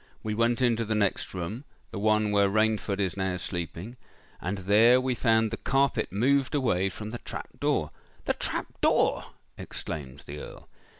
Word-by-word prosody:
We 110 - -2
went 115 +3 +1
into 115 -2 +2
the 110 0 -1
next 100 -2 0
room—the 100 - -7
one 110 0 +2
where 100 -1 +4
Rainford 110 -1 +1
is 95 -3 0
now 95 -2 -1
sleeping—and 90 +2 -6
there 105 +6 +5
we 130 0 0
found 110 -2 +2
the - - -3
carpet 135 -6 +1
moved 130 +7 +2
away 95 -9 +1
from 105 +3 -7
the 120 - -5
trap - - -7
door——" - - 0 0.3
"The - - +2
trap - - -2 0.2
door!" - - +3 0.3
exclaimed 70 -3 -6
the 75 +1 -7
Earl. - - -10
105 Hz, 160 wpm, -28 LUFS, 95-120 Hz, 0.3 s, there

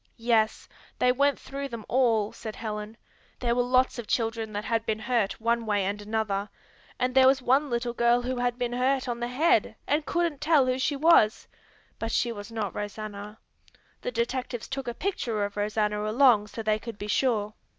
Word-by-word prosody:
"Yes, 225 -2 +1 0.3
they 250 - +4
went 280 +2 +2
through 275 0 -6
them 230 -4 -7
all," 230 -5 +2
said 220 -2 -8
Helen. 215 0 -5 0.4
"There 240 -2 0
were 245 - +2
lots 255 0 +2
of 230 - -6
children 225 -2 -1
that 205 +1 -4
had 225 -1 0
been 220 -1 -1
hurt 220 -2 -1
one 230 0 0
way 205 -2 +1
and 205 +2 -2
another, 210 -1 -2 0.5
and 250 0 0
there 260 0 +6
was 265 0 +4
one 270 +3 +2
little 240 0 -1
girl 235 +1 +3
who 255 +1 -2
had 245 0 0
been 245 -1 -2
hurt 260 +2 +1
on 240 -1 -3
the 240 - -2
head, 280 +7 +2
and 295 +1 +1
couldn't 340 -3 -1
tell 305 -4 +4
who 255 0 0
she 285 +2 0
was, 280 -7 +4 0.5
but 225 0 -3
she 240 - +1
was 205 0 -8
not 220 -3 -3
Rosanna. 210 0 -6 0.6
The - - -3
detectives 240 0 -3
took 270 -1 -5
a 240 - -3
picture 235 - -1
of 205 - -7
Rosanna 210 0 0
along 230 -3 +4
so 225 +2 -7
they 215 0 +1
could 225 -1 -8
be 205 - -6
sure." 210 -1 0
235 Hz, 195 wpm, -27 LUFS, 215-255 Hz, 0.6 s, there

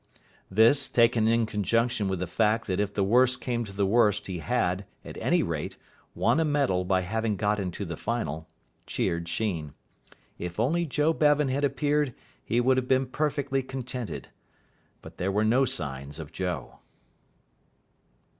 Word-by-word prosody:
This, 115 +8 +4
taken 115 -2 +3
in 115 0 +3
conjunction 115 +1 0
with 95 -1 -1
the 90 - -2
fact 110 +5 +1
that 95 -3 -1
if 100 -1 0
the 100 -1 0
worst 125 +5 +4
came 120 -2 -2
to 100 - -9
the 100 0 0
worst 105 0 +3
he 90 -3 -4
had, 95 -3 0 0.2
at - - -8
any - - +2
rate, - - -4 0.4
won - - +2
a - - +3
medal 140 - +1
by 95 0 +1
having 110 +3 -1
got 105 +2 0
into 95 +1 -4
the 85 -2 -5
final, 80 -8 -3 0.4
cheered 85 0 -1
Sheen. 85 -9 -2 0.6
If 90 +2 -5
only 165 +9 +1
Joe 150 +3 +2
Bevan 150 -2 +3
had 140 +2 -1
appeared 145 -1 +1 0.3
he 120 - 0
would 130 +2 +3
have 130 -1 0
been 130 0 +3
perfectly 140 0 -1
contented. 125 -3 -6 0.7
But - - -12
there 95 +2 -1
were 105 +2 +1
no 125 +5 +4
signs 70 - -3
of 80 -2 -8
Joe. 90 -10 -4
110 Hz, 165 wpm, -27 LUFS, 95-130 Hz, 0.7 s, This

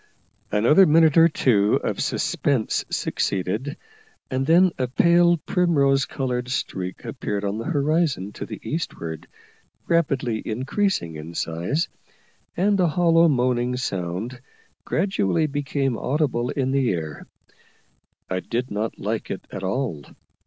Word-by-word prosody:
Another 120 - +5
minute 160 -1 +5
or 165 0 +8
two 110 -10 +2
of - - -2
suspense 130 -6 0
succeeded, 105 - -2 0.5
and 130 +1 -1
then 175 +3 +5
a 130 - +1
pale, 170 +6 +4
primrose 145 -6 +2
coloured 125 -2 -3
streak 95 -7 -4
appeared 100 -1 -3
on 100 +2 -2
the 115 - -5
horizon 150 - 0
to - - -7
the - - -7
eastward, 85 - -4 0.6
rapidly 135 -9 +1
increasing 125 - -1
in 80 +2 -9
size, 90 - -1 0.7
and 200 +2 +2
a 180 - +4
hollow 170 0 +4
moaning 125 -3 +1
sound 100 +3 -4 0.4
gradually 165 - +1
became 140 -3 -1
audible 130 -3 0
in 130 -2 -1
the 135 -3 +2
air. 80 -4 -5 1.0
I 95 - -2
did 120 +6 -3
not 105 +2 -3
like 110 +2 -3
it 95 - -5
at 100 - -6
all. 95 - -2
130 Hz, 125 wpm, -23 LUFS, 105-160 Hz, 1.0 s, or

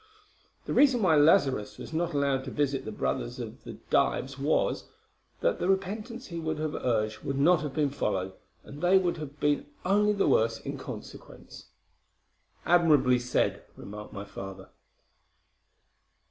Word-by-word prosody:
The - - -3
reason 260 -6 +4
why 165 -4 +5
Lazarus 140 -7 +3
was - - -9
not 170 +1 -1
allowed 140 -2 +1
to - - -5
visit 140 -1 -1
the 110 - -5
brothers 65 - -2
of - - -7 0.3
Dives 135 +1 +1
was, 145 +3 +1 0.6
that - - +1
the 180 - 0
repentance 210 +6 -2
he 170 -6 -6
would 160 -1 -2
have 155 0 -2
urged 110 -3 -1
would 135 - -3
not 165 +5 +4
have 145 -1 -1
followed, 95 -8 -2 0.3
and 145 +2 -11
they 180 +2 +5
would 180 -2 +1
have 150 -2 -8
been 145 -1 +1 0.2
only 210 +2 +3
the 200 - +1
worse 115 0 +2
in - - -5
consequence." - - -10 1.0
"Admirably 150 -8 +4
said," 125 +1 0
remarked 105 +1 -9
my 100 0 -7
father. 95 -1 -9
145 Hz, 145 wpm, -28 LUFS, 125-175 Hz, 1.0 s, why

